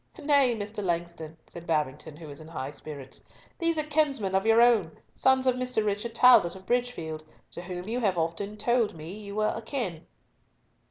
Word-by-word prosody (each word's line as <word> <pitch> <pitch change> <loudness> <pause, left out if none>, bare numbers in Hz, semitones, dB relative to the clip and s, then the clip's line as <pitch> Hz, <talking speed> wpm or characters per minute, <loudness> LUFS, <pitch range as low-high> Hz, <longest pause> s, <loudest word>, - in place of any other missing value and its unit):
"Nay, 285 -5 +3
Mr. 210 0 -5
Langston," 170 -3 -3
said 170 0 -11
Babington, 150 -1 -1
who 165 - -10
was 145 0 -9
in 155 - -11
high 140 -4 -5
spirits, 145 -3 -9 0.4
"these 335 -1 +1
are 310 - +2
kinsmen 290 -10 +1
of 195 +3 +1
your 225 0 +6
own, 225 -9 +4 0.2
sons 265 0 +3
of 255 - +4
Mr. 250 -4 0
Richard 210 +3 -2
Talbot 235 -9 +6
of 190 0 -12
Bridgefield, 215 -11 -2 0.3
to - - -5
whom 180 +1 -6
you 235 +3 -1
have 195 -7 +1
often 170 +6 -2
told 235 -2 +1
me 160 +2 -8
you 205 -1 -8
were 215 0 +1
akin." 225 - -4
205 Hz, 180 wpm, -28 LUFS, 165-245 Hz, 0.4 s, your